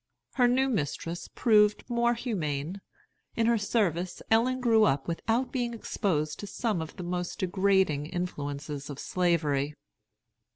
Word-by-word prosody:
Her 250 -2 +4
new 260 +2 +3
mistress 170 - -2
proved 210 -3 +3
more 235 0 +2
humane. 180 - -3 0.5
In 230 - +2
her 230 -1 +3
service 185 -5 0
Ellen 250 +3 +3
grew 230 -3 +4
up 135 -9 +2
without 225 +9 -1
being 240 -3 -2
exposed 155 -9 -1
to 205 - -6
some 210 -3 -1
of 160 - -7
the 185 - -6
most 180 0 -3
degrading 190 -5 +2
influences 145 -5 -4
of 145 - -6
Slavery. 150 -5 0
185 Hz, 135 wpm, -28 LUFS, 155-230 Hz, 0.5 s, Her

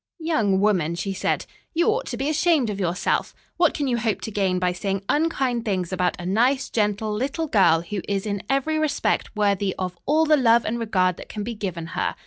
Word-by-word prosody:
"Young 305 - +1
woman," 185 -6 +1
she 195 +3 -3
said, - - -1 0.3
"you 340 +4 +2
ought 485 +3 0
to 240 - -4
be 270 +3 -2
ashamed 305 -6 +2
of 200 - -5
yourself. 180 -1 -1 0.2
What 345 -2 +3
can 285 - -1
you 240 -2 0
hope 220 -2 0
to 220 - -5
gain 195 -3 +1
by 180 0 +1
saying 195 +2 -3
unkind 270 -6 0
things 190 -5 -2
about 180 0 0
a 175 - -6
nice, 250 +8 +1
gentle, 210 0 0
little 275 +9 -2
girl 190 - +4
who 195 +3 -4
is 195 0 -1
in 200 -2 -2
every 275 +4 +1
respect 295 -6 0
worthy 200 -2 +1
of 180 -1 -3
all 310 +3 +3
the 305 -1 +4
love 235 -3 +4
and 235 +2 -2
regard 185 -6 +1
that - - -11
can 210 - -5
be 235 +3 -4
given 185 -6 -4
her? - - -1
215 Hz, 215 wpm, -23 LUFS, 190-275 Hz, 0.3 s, girl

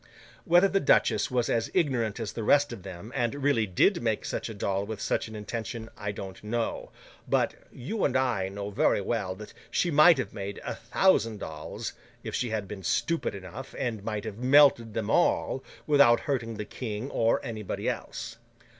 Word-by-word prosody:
Whether 175 +3 +6
the 195 0 +1
duchess 150 - +3
was 125 -2 +1
as 115 -1 0
ignorant 125 - +1
as 110 -3 -4
the 115 - -4
rest 145 +3 +4
of 110 - -8
them, 95 +4 -9
and 120 -1 0
really 120 -7 +2
did 170 - +3
make 110 -3 -1
such - - -3
a - - -5
doll 100 -1 -1
with 105 0 -6
such - - -1
an 110 - -9
intention, 110 +2 -5
I 100 0 -4
don't 95 -1 -8
know; 115 +2 -2 0.4
but, - - +2 0.2
you 190 - -4
and - - +2
I 120 -8 0
know 100 +1 -5
very 100 - +2
well 100 -2 -2
that 105 +2 -10 0.2
she 175 - +1
might 155 +2 +7
have 130 - -3
made 100 -1 -5
a - - -2
thousand 115 - +2
dolls, 75 -3 -6 0.3
if - - -5
she 125 - -1
had 110 -3 -2
been 100 0 -7
stupid 165 - 0
enough, 100 +8 -9
and 115 -5 -2
might 105 -1 -3
have 110 0 -6
melted 130 -4 +5
them 110 -2 -1
all, - - +2 0.2
without 140 -5 +5
hurting 120 -5 -2
the 105 0 -5
King 115 +3 -5
or 115 0 +2
anybody 110 -4 -4
else. 115 0 -4
115 Hz, 190 wpm, -28 LUFS, 105-130 Hz, 0.4 s, might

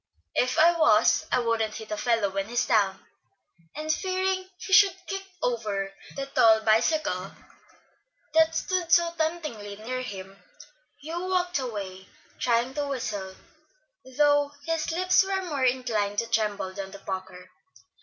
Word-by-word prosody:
"If 250 - +1
I 335 +2 +7
was, 220 -9 +4
I - - +3
wouldn't 230 -3 0
hit 220 -1 -8
a - - 0
fellow 225 -2 +1
when 195 +2 -3
he's 240 +1 0
down;" 200 -5 +1 0.7
and 310 +1 -1
fearing 375 +1 -1
he 390 - -5
should 390 -2 +7
kick 390 0 -4 0.2
over 205 -5 -2 0.2
the 275 - -3
tall 225 -5 +4
bicycle 220 - +1 1.0
that 320 0 +4
stood 360 -1 -1
so 340 0 +4
temptingly 305 -11 -3
near 250 +5 -4
him, 195 -4 -8 0.6
Hugh 340 +4 -4
walked 360 -3 +1
away, 195 -7 -6 0.3
trying 240 +1 +1
to 290 0 -2
whistle, 205 -8 -4 0.8
though 290 -1 +3
his 330 0 -1
lips 365 +2 +3
were 385 0 -2
more 290 -7 -1
inclined 230 -5 0
to 230 - +1
tremble 210 -4 -1
than 195 0 -6
to - - -8
pucker. 185 -1 -7
245 Hz, 145 wpm, -26 LUFS, 205-320 Hz, 1.0 s, I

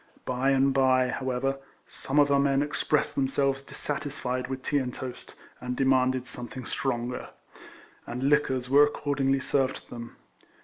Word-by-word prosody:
By 130 +2 0
and 135 0 +3
bye, 130 -1 +3
however, 130 +1 -1 0.3
some 135 - -4
of 145 -1 +5
our 140 - +4
men 140 0 +3
expressed 150 0 0
themselves 135 0 0
dissatisfied 140 -3 -3
with 130 -1 -5
tea 145 - +1
and 125 -2 -3
toast, 125 0 -7 0.2
and 125 0 -4
demanded 130 -1 +2
something 125 0 -7
stronger; 125 -1 -3 0.8
and 125 +2 -4
liquors 135 -3 +2
were 140 +3 +6
accordingly 140 -2 +1
served 135 0 +1
to - - -11
them. 115 -1 -8
135 Hz, 145 wpm, -27 LUFS, 125-140 Hz, 0.8 s, were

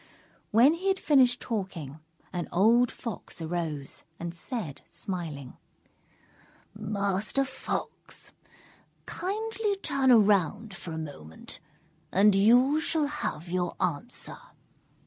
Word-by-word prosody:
When 245 +8 +6
he 360 +4 -4
had 385 0 +3
finished 260 -7 +4
talking, 180 - -4 0.3
an 175 -1 -2
old 230 +7 +5
Fox 230 -7 -6
arose, 160 -4 -3 0.2
and 170 0 -4
said, 175 - -5
smiling: 160 -8 -6 1.2
"Master 205 +4 -1
Fox, 260 0 -5 0.7
kindly 430 +2 -2
turn 275 -8 +1
around 210 -2 +4
for 175 -2 -8
a 160 - -4
moment, 140 - -8 0.5
and 205 +2 +5
you 245 +9 +5
shall 320 -2 +1
have 285 - -4
your 180 0 -1
answer." 180 +8 -2
205 Hz, 105 wpm, -28 LUFS, 170-260 Hz, 1.2 s, When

